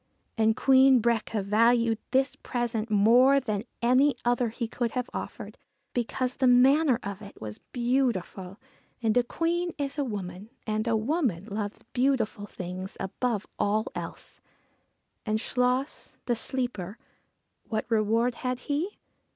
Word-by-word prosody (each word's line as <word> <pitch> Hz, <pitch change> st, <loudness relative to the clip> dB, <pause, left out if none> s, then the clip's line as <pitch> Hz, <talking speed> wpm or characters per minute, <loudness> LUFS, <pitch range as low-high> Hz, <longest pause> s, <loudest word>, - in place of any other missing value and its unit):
And 220 Hz, -1 st, +3 dB
Queen 265 Hz, 0 st, +6 dB
Breaca 225 Hz, -2 st, 0 dB
valued 230 Hz, +2 st, +3 dB
this 265 Hz, +2 st, +1 dB
present 235 Hz, -2 st, -3 dB
more 240 Hz, +7 st, +5 dB
than 215 Hz, -4 st, -3 dB, 0.2 s
any 255 Hz, +3 st, +4 dB
other 240 Hz, 0 st, +2 dB
he 230 Hz, +1 st, -4 dB
could 235 Hz, 0 st, -2 dB
have 250 Hz, 0 st, -3 dB
offered, -, -, -7 dB, 0.3 s
because 250 Hz, +1 st, -1 dB
the 265 Hz, -, +3 dB
manner 260 Hz, +2 st, +5 dB
of 200 Hz, 0 st, -5 dB
it 200 Hz, -1 st, -12 dB
was 105 Hz, -1 st, -7 dB
beautiful, 235 Hz, -7 st, -1 dB, 0.5 s
and 220 Hz, -1 st, +2 dB
a 245 Hz, -, +6 dB
Queen 340 Hz, +7 st, -1 dB
is 285 Hz, 0 st, -3 dB
a -, -, +2 dB
woman, 200 Hz, -4 st, -6 dB, 0.2 s
and 215 Hz, +1 st, -1 dB
a 230 Hz, -1 st, +2 dB
woman 225 Hz, -, 0 dB
loves 205 Hz, -1 st, -5 dB
beautiful 245 Hz, -5 st, 0 dB
things 185 Hz, 0 st, -7 dB
above 210 Hz, +2 st, -2 dB
all 215 Hz, +2 st, +1 dB
else. -, -, -8 dB, 0.8 s
And 215 Hz, -1 st, 0 dB
Chluas, 250 Hz, +4 st, -1 dB
the 240 Hz, -, +1 dB
sleeper 230 Hz, -5 st, -2 dB, 0.7 s
what 220 Hz, -2 st, -2 dB
reward 230 Hz, +2 st, +2 dB
had 250 Hz, -2 st, -2 dB
he? 310 Hz, +10 st, -2 dB
235 Hz, 135 wpm, -27 LUFS, 215-255 Hz, 0.8 s, Queen